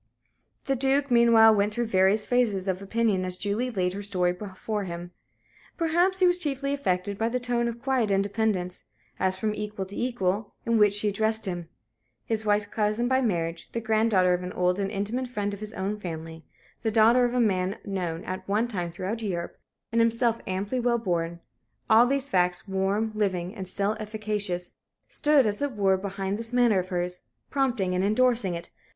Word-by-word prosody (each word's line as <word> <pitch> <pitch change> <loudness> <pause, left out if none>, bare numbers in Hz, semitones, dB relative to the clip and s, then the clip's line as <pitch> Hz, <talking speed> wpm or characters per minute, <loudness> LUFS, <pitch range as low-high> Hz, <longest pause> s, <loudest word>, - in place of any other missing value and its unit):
The 270 - +1
Duke 270 +1 +1
meanwhile 230 -2 +7
went 205 0 +1
through 240 - 0
various 200 0 +3
phases 220 -6 +1
of 190 0 -1
opinion 205 -2 0
as 185 0 -2
Julie 210 +6 -1
laid 185 -6 -1
her 200 - -5
story 185 -3 +1
before 205 +2 -5
him. 175 0 -6 0.7
Perhaps 345 +3 +2
he 375 - +4
was 355 0 +4
chiefly 275 -3 -1
affected 200 -6 -1
by 225 +1 +1
the 250 +1 -1
tone 240 -1 0
of 235 0 -4
quiet 260 -3 0
independence 195 -2 0 0.4
as 185 0 +1
from 215 +2 -1
equal 210 -2 -4
to 195 - -11
equal 210 -4 -1
in 230 -1 +2
which 205 -1 +5
she 205 0 +2
addressed 220 +2 0
him. 175 -3 -4 0.6
His 220 -1 -1
wife's 210 -1 +2
cousin 215 +3 0
by 260 +1 +2
marriage; 170 -7 -2
the 230 - -1
granddaughter 215 -5 +3
of 180 - -1
an 180 0 -6
old 180 +1 +1
and 195 -1 -1
intimate 215 +6 -2
friend 205 -4 -3
of 200 - -7
his 215 0 -7
own 200 +2 -3
family; 165 -3 -7 0.4
the 225 - 0
daughter 230 +3 +5
of 245 0 0
a - - +2
man 190 -4 +1
known 180 -4 -3
at 185 0 -6
one 215 +4 +2
time 180 -7 -3
throughout 195 +7 -4
Europe, 175 -5 -4 0.3
and 230 0 +3
himself 230 0 +2
amply 200 +7 -2
well 240 0 +2
born 170 -5 -2 0.5
all 230 +2 +7
these 275 +1 0
facts, 180 -3 +1
warm, 195 +3 0
living, 190 -4 -1
and 190 -4 -7
still 200 +3 -1
efficacious, 210 -4 -3 0.4
stood, 295 -4 +3
as 210 +2 -1
it 285 -2 -1
were, 195 -3 +3
behind 195 +1 -3
this 230 0 -5
manner 240 -5 +4
of 185 0 -4
hers, 180 0 -2 0.3
prompting 245 -10 0
and 180 +1 +1
endorsing 215 -3 +2
it. 170 0 -7
210 Hz, 190 wpm, -26 LUFS, 185-235 Hz, 0.7 s, meanwhile